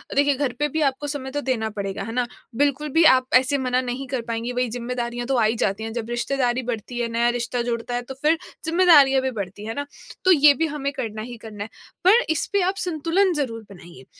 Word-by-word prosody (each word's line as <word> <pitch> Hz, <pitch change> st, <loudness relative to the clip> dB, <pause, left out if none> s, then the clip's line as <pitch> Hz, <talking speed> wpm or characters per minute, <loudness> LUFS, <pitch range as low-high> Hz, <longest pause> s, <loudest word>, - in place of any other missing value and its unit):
देखिए 285 Hz, 0 st, +3 dB
घर 265 Hz, -2 st, -1 dB
पे 295 Hz, -, +2 dB
भी 315 Hz, +2 st, -2 dB
आपको 275 Hz, +1 st, 0 dB
समय 275 Hz, -2 st, -5 dB
तो 290 Hz, -, -2 dB
देना 240 Hz, -5 st, -1 dB
पड़ेगा 200 Hz, -2 st, -4 dB
है 225 Hz, -, -6 dB
ना, 250 Hz, 0 st, +1 dB, 0.3 s
बिल्कुल 290 Hz, +3 st, +1 dB
भी 330 Hz, -, +5 dB
आप 260 Hz, -4 st, +6 dB
ऐसे 265 Hz, +2 st, +4 dB
मना 255 Hz, -1 st, 0 dB
नहीं 255 Hz, +2 st, -4 dB
कर 255 Hz, -2 st, -2 dB
पाएँगी 230 Hz, +1 st, -3 dB
वही 250 Hz, 0 st, -1 dB
ज़िम्मेदारियाँ 240 Hz, 0 st, -4 dB
तो 270 Hz, -, +1 dB
आ 230 Hz, -, +3 dB
ही 220 Hz, +2 st, +1 dB
जाती 210 Hz, -1 st, -1 dB
हैं 225 Hz, -, -4 dB
जब 235 Hz, -1 st, -4 dB
रिश्तेदारी 245 Hz, +1 st, 0 dB
बढ़ती 240 Hz, 0 st, -4 dB
है, 235 Hz, -, 0 dB
नया 235 Hz, +1 st, +2 dB
रिश्ता 240 Hz, +1 st, -2 dB
जुड़ता 235 Hz, 0 st, -3 dB
है 245 Hz, -, -1 dB
तो 245 Hz, +2 st, -8 dB
फ़िर 315 Hz, +2 st, +3 dB, 0.3 s
ज़िम्मेदारियाँ 315 Hz, -6 st, +5 dB
भी 265 Hz, -, -1 dB
बढ़ती 200 Hz, -3 st, -6 dB
हैं। 215 Hz, -, -6 dB
है 225 Hz, -, -4 dB
ना? 285 Hz, 0 st, -3 dB, 0.4 s
तो 375 Hz, -, +6 dB
ये 295 Hz, -4 st, +7 dB
भी 325 Hz, +4 st, 0 dB
हमें 290 Hz, -2 st, -3 dB
करना 215 Hz, -4 st, -4 dB
ही 240 Hz, +1 st, -8 dB
करना 210 Hz, -2 st, -7 dB
है 215 Hz, -, -9 dB, 0.4 s
पर 470 Hz, +4 st, +6 dB
इस 320 Hz, -2 st, +1 dB
पे 400 Hz, -, +3 dB
आप 375 Hz, +2 st, +1 dB
संतुलन 355 Hz, +2 st, +1 dB
ज़रूर 250 Hz, -7 st, -3 dB
बनाइए। 175 Hz, -8 st, -13 dB
255 Hz, 240 wpm, -23 LUFS, 235-285 Hz, 0.4 s, ये